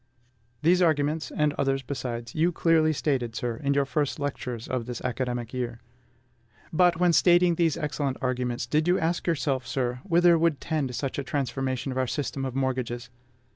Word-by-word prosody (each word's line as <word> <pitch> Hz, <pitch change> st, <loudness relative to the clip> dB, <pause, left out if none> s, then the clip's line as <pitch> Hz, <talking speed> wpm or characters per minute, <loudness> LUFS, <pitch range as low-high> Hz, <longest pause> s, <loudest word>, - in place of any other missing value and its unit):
These 180 Hz, +3 st, +4 dB
arguments, 155 Hz, -3 st, +1 dB
and 150 Hz, -1 st, +1 dB
others 135 Hz, -1 st, +1 dB
besides, 120 Hz, -3 st, -5 dB
you 165 Hz, +3 st, +2 dB
clearly 160 Hz, -2 st, +3 dB
stated, 135 Hz, -6 st, -1 dB
sir, 120 Hz, -1 st, -2 dB
in 140 Hz, -1 st, 0 dB
your 140 Hz, 0 st, +3 dB
first 145 Hz, +1 st, -1 dB
lectures 125 Hz, -5 st, -4 dB
of 125 Hz, -2 st, -3 dB
this 125 Hz, -2 st, -4 dB
academic 125 Hz, -1 st, -3 dB
year. 120 Hz, -2 st, -3 dB, 0.9 s
But, 175 Hz, 0 st, +4 dB
when 180 Hz, -1 st, +4 dB
stating 175 Hz, +2 st, +5 dB
these 165 Hz, -2 st, +1 dB
excellent 150 Hz, -4 st, -2 dB
arguments, 125 Hz, -2 st, -1 dB
did 155 Hz, +6 st, +1 dB
you 180 Hz, +1 st, +4 dB
ask 170 Hz, +2 st, -1 dB
yourself, 140 Hz, -6 st, 0 dB
sir, 125 Hz, -2 st, -1 dB
whither 175 Hz, -2 st, +4 dB
would 165 Hz, -3 st, +2 dB
tend 145 Hz, -6 st, -2 dB
such 135 Hz, +4 st, -3 dB
a -, -, -2 dB
transformation 135 Hz, -3 st, -2 dB
of 130 Hz, -, -2 dB
our 130 Hz, -, +1 dB
system 135 Hz, 0 st, -3 dB
of 130 Hz, -1 st, -4 dB
mortgages?... 125 Hz, -2 st, -2 dB
140 Hz, 175 wpm, -27 LUFS, 125-160 Hz, 0.9 s, stating